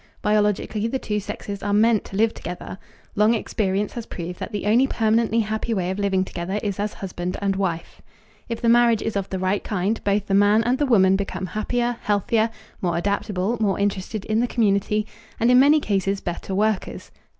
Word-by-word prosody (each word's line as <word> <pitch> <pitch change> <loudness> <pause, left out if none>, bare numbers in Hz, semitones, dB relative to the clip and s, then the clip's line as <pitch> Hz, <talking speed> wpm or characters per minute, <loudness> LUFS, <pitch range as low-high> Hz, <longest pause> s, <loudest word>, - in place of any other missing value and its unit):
Biologically 210 +1 +1
the 265 - -1
two 210 -4 -2
sexes 200 0 -6
are 205 0 -1
meant 220 0 +4
to - - -9
live 225 +2 +2
together. 180 +2 -7 0.4
Long 215 +3 +4
experience 205 -2 -1
has 235 -2 -6
proved 175 0 -6
that - - -5
the 205 -2 -4
only 235 +6 +4
permanently 225 -1 +2
happy 220 +2 -2
way 185 -2 -1
of 190 - -4
living 190 -2 +1
together 185 +3 -4
is 200 -2 -2
as 205 +1 -2
husband 180 -2 -5
and 195 -1 0
wife. 180 -4 -3 0.5
If 230 - -4
the 235 - 0
marriage 235 -1 +4
is 225 - -3
of 195 -1 -2
the 190 - -3
right 185 +2 0
kind, 205 +2 -1
both 205 0 +1
the 195 - -2
man 205 +3 +4
and 245 +3 +1
the 290 - +2
woman 195 -5 +4
become 195 -1 -4
happier, 240 +5 -1
healthier, 215 +2 +1 0.3
more 175 -2 0
adaptable, 200 +3 -1
more 200 -3 +1
interested 200 +1 -2
in 220 0 +1
the 245 - +1
community, 210 -2 +1 0.3
and, 235 +2 +3
in 250 - +7
many 290 +3 +6
cases, 195 -5 -1
better 180 +1 -4
workers. 215 0 -1
205 Hz, 195 wpm, -23 LUFS, 195-225 Hz, 0.5 s, in